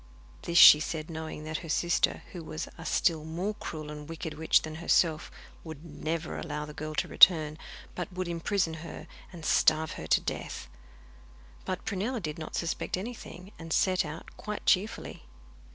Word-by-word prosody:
This 170 - -1
she 150 - +11
said 155 +1 -4
knowing 160 -1 -6
that 155 0 -3
her 165 - -9
sister, 175 +2 +1
who 175 -3 -7
was 155 0 -5
a 165 - -8
still 160 -4 +2
more 175 +6 -3
cruel 155 -7 -7
and 150 0 -9
wicked 165 -1 -5
witch 160 +1 +3
than 155 - -6
herself, 165 -2 +2 0.3
would 160 -1 -9
never 160 +1 -4
allow 150 -2 -4
the 150 - -10
girl 155 +1 -6
to - - 0
return, 155 -4 +6 0.4
but 180 +1 -5
would 185 0 -4
imprison 170 +1 -1
her 170 - -8 0.3
and 170 -4 -9
starve 155 0 +3
her - - -7
to - - +4
death. - - -5 1.0
But 185 - -4
Prunella 220 +4 -2
did 155 -5 -5
not 155 - -6
suspect 170 +1 -2
anything, 195 -3 -8
and 165 -1 -9
set 185 +2 +3
out 160 +1 -9
quite 210 -1 -6
cheerfully. 210 +5 0
165 Hz, 170 wpm, -29 LUFS, 155-180 Hz, 1.0 s, she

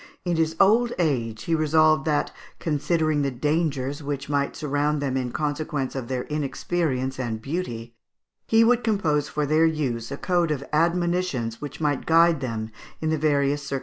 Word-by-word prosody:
In 175 -1 +1
his 160 0 0
old 230 +5 +4
age, 115 -10 -1
he 165 - -1
resolved 155 0 +3
that, 150 -2 +1 0.3
considering 155 0 0
the 140 - +1
dangers 145 0 -1
which 140 -1 -4
might 140 -1 0
surround 150 0 0
them 140 -2 -2
in 125 -2 -2
consequence 150 -2 -2
of 130 -3 -5
their 130 -1 -2
inexperience 140 -2 -2
and 115 -3 -2
beauty, 120 -5 -4 0.5
he 225 0 +5
would 240 +1 +3
compose 160 -10 +1
for 150 -1 -1
their 155 +3 +4
use 130 -7 -2
a 140 - -4
code 175 0 +1
of 145 -3 -2
admonitions 170 -7 0
which 145 - -7
might 145 -3 -1
guide 165 -2 +5
them 110 -3 -4 0.3
in 160 0 -1
the - - +2
various 145 -1 +1
circumstances 140 - -8
of - - -4
life. - - -1
150 Hz, 180 wpm, -24 LUFS, 135-165 Hz, 0.5 s, he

